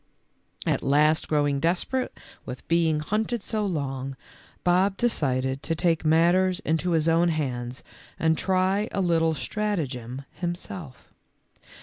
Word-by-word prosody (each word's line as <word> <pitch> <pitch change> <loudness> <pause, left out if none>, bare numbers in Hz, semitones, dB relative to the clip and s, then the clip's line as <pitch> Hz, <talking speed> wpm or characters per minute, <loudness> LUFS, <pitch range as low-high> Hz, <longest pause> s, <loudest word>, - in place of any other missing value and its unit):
At - - +1
last 150 +3 +3
growing 145 -2 +1
desperate 180 - -1 0.2
with 125 - -8
being 165 -2 +2
hunted 215 +6 -1
so 215 -2 -1
long, 135 -5 -3 0.5
Bob 185 +2 +3
decided 130 - 0
to 165 - -1
take 165 0 +1
matters 175 +4 +3
into 165 +2 0
his 160 -1 +2
own 165 +1 +4
hands 125 -6 -3 0.3
and 160 0 +2
try 190 +4 +1
a - - -2
little 165 -3 +2
stratagem 140 - -3
himself. 175 -3 -6
165 Hz, 120 wpm, -26 LUFS, 145-185 Hz, 0.5 s, own